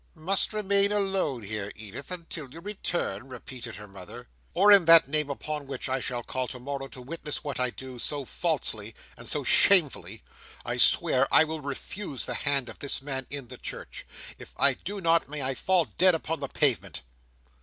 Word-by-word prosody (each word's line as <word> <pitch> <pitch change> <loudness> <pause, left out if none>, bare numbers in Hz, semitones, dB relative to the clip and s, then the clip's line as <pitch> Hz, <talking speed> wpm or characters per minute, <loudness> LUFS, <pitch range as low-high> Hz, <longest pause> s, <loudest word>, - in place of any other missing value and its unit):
"Must 180 +5 +1
remain 200 -1 +2
alone 195 - 0
here, 105 0 -5
Edith, 110 +5 -8
until 165 -5 -6
you 160 - -11
return!" 170 - -3
repeated 125 -2 -9
her 105 +1 -10
mother. 95 -9 -11 0.3
"Or 205 +1 +6
in 200 -4 +7
that 165 -4 +8
name 150 0 +1
upon 150 0 -5
which 135 -1 -3
I 130 0 -1
shall 125 -1 -3
call 130 +1 -3
to 125 - -6
morrow 135 +1 -5
to 130 - -10
witness 150 +2 -5
what 145 -3 -4
I 125 0 +1
do, 130 0 -9
so 145 +2 -1
falsely: 115 -10 -1 0.2
and - - -6
so - - 0
shamefully, 130 - +4 0.4
I - - -2
swear 130 +1 +4
I - - +7
will 160 0 -5
refuse 140 +2 -5
the - - -3
hand 140 -3 0
of - - -11
this 140 -1 -3
man 135 -2 -3
in 135 -3 -7
the 125 - -10
church. - - -8 0.3
If - - -13
I 140 -1 +5
do 200 +9 -6
not, 165 -3 +2
may 145 -1 -5
I 135 +1 -1
fall 180 +4 +2
dead 185 -1 +3
upon 160 0 -3
the 140 - -3
pavement!" 135 - 0
140 Hz, 190 wpm, -27 LUFS, 125-165 Hz, 0.4 s, that